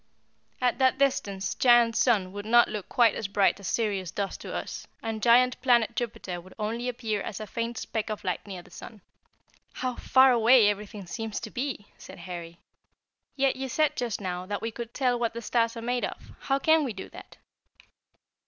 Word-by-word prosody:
At 250 0 +1
that 260 0 +3
distance 200 -8 0
Giant 240 -2 +5
Sun 205 -8 +2
would 205 +1 -7
not 240 +1 +6
look 210 -3 -6
quite 235 -4 +4
as 210 - -3
bright 200 0 +2
as 200 - -7
Sirius 200 -6 -1
does 200 +1 -3
to - - -8
us, - - -5 0.2
and 225 -1 -3
giant 245 +2 +4
Planet 240 -3 +3
Jupiter 210 -6 -4
would 185 +2 -16
only 230 +4 -2
appear 225 -4 -2
as 195 - -5
a 215 - -5
faint 230 +2 -4
speck 220 -1 -3
of 215 0 -5
light 185 +1 -3
near 185 -3 -7
the - - -19
sun." 220 -3 -11 0.7
"How 255 -1 -2
far 260 +1 +5
away 235 -2 +6
everything 205 -1 -5
seems 220 +3 -4
to 220 - -7
be!" 255 -5 -4
said 190 - -11
Harry. 170 -1 -8 0.8
"Yet 270 -1 +2
you 265 0 -4
said 300 +3 +1
just 235 -4 -2
now 180 -2 -4
that 205 0 -3
we 225 - -2
could 235 +1 -8
tell 250 -2 +1
what 230 -1 -1
the - - -3
stars 230 0 0
are 230 - -6
made 245 +1 -1
of. - - -9
How 270 - 0
can 315 +2 +3
we 255 -6 -3
do 195 - -8
that?" - - -13
230 Hz, 200 wpm, -27 LUFS, 200-245 Hz, 0.8 s, not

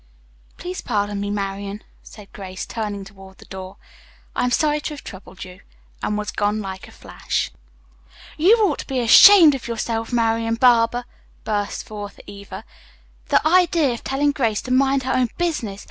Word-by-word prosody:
"Please 360 +1 -6
pardon 205 -3 -2
me, 205 - -3
Marian," 200 0 -4 0.2
said 210 -2 -15
Grace, 190 -2 -7
turning 210 -3 -5
toward 195 -1 -15
the - - -16
door. 190 0 -9 0.6
"I - - 0
am - - +1
sorry 300 +4 +1
to 300 - -5
have 285 - -12
troubled 190 -1 -10
you," 180 0 -12 0.4
and 210 - -2
was 210 0 -4
gone 210 +1 -1
like 190 -2 -7
a - - -15
flash. - - -4 0.8
"You 375 +9 +5
ought - - -2
to - - -7
be 265 -2 -2
ashamed 320 - +8
of 265 -4 -6
yourself, 225 0 -3
Marian 230 -1 +1
Barber!" 240 0 +3 0.4
burst 205 -1 -3
forth 205 -1 -8
Eva. 200 0 -10 0.6
"The - - +2
idea 335 -5 +3
of 235 - -8
telling 285 +2 +1
Grace 230 -7 -1
to 255 - -6
mind 270 +1 +2
her 260 - -1
own 250 -2 +1
business! 270 - -2
225 Hz, 170 wpm, -21 LUFS, 200-270 Hz, 0.8 s, ashamed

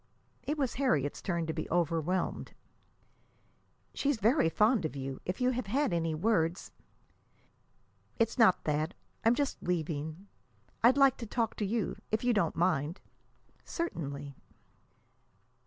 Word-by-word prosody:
It 300 +2 -3
was 270 -4 0
Harriet's 145 - +1
turn 170 -3 -1
to 160 - -2
be 160 - -4
overwhelmed. 170 +1 0 1.4
"She's 285 -2 0
very 225 - +3
fond 215 +5 +3
of 155 - -3
you. 135 -1 -5
If 180 - -3
you 250 0 +3
have 250 -3 -3
had 265 -1 +1
any 165 -2 0
words 170 -1 0 0.8
" - - -39
"It's 230 +1 0
not 220 -6 +5
that. 155 +4 -1 0.3
I'm 230 +2 +4
just 285 +1 -1
leaving. 160 0 -3 0.6
I'd 250 +4 +6
like 275 -2 +5
to 230 - -6
talk 225 0 -1
to 210 - -1
you, 225 +1 -1
if 220 +2 0
you 245 0 +3
don't 170 -7 +1
mind." 165 -1 0 0.6
"Certainly." 145 - -4
185 Hz, 140 wpm, -31 LUFS, 160-235 Hz, 1.4 s, I'd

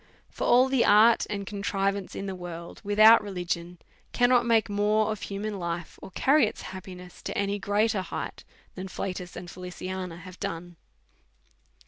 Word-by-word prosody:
For - - -4
all 250 +2 +6
the 265 -3 +2
art 220 +3 +5
and 200 -1 -3
contrivance 200 -1 -2
in 195 - -4
the 195 - -4
world, 175 -2 -8
without 215 +2 +7
religion, 175 -3 -4 0.4
cannot 245 -1 +4
make 225 -2 +3
mere 210 +1 +2
of 215 -1 -3
human 205 0 -4
life, 170 -1 -5
or - - -9
carry 270 +6 +3
its 215 - -7
happiness 180 -1 -10
to - - -5
any 200 0 -1
greater 205 +1 +1
height, 185 - -6 0.3
than 190 +1 -6
Flatus 180 -1 -5
or 175 - -7
Feliciana 180 0 -6
have 180 +1 -12
done. 170 +1 -5
195 Hz, 155 wpm, -27 LUFS, 180-215 Hz, 0.4 s, without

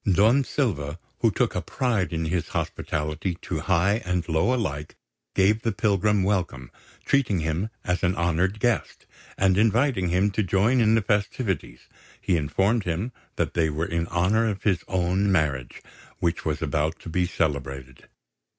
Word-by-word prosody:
Don 110 +9 +4
Silva, 85 - -2 0.2
who - - +4
took - - 0
a - - -1
pride 110 - -1
in 80 -1 -2
his 85 0 -1
hospitality 75 +4 -2
to 80 - -3
high 95 +6 +2
and 90 -2 -1
low 80 +8 +2
alike, 75 - -2 0.4
gave 105 +3 +3
the 115 - 0
pilgrim 105 0 +2
welcome, 90 -11 -1 0.3
treating 120 -11 +2
him 80 +7 -1
as 90 0 -1
an 90 +1 +1
honoured 90 +4 0
guest; 120 -1 -1 0.3
and 95 0 +3
inviting 115 -3 +2
him 95 +4 +2
to 105 - 0
join 105 +6 +2
in 110 0 +4
the 110 - +2
festivities, 100 - -1 0.4
he 90 - +1
informed 95 +8 +1
him 90 +8 -2 0.2
that - - -1
they 80 -2 +2
were 80 +2 -2
in 85 0 -2
honour 100 +7 +2
of 100 -2 -4
his 95 -5 +1
own 95 +2 +1
marriage, 70 -8 -1 0.3
which 85 -1 -1
was 75 -2 -1
about 75 +2 0
to - - -13
be 90 +2 0
celebrated. 70 -6 -3
90 Hz, 160 wpm, -25 LUFS, 80-105 Hz, 0.4 s, Don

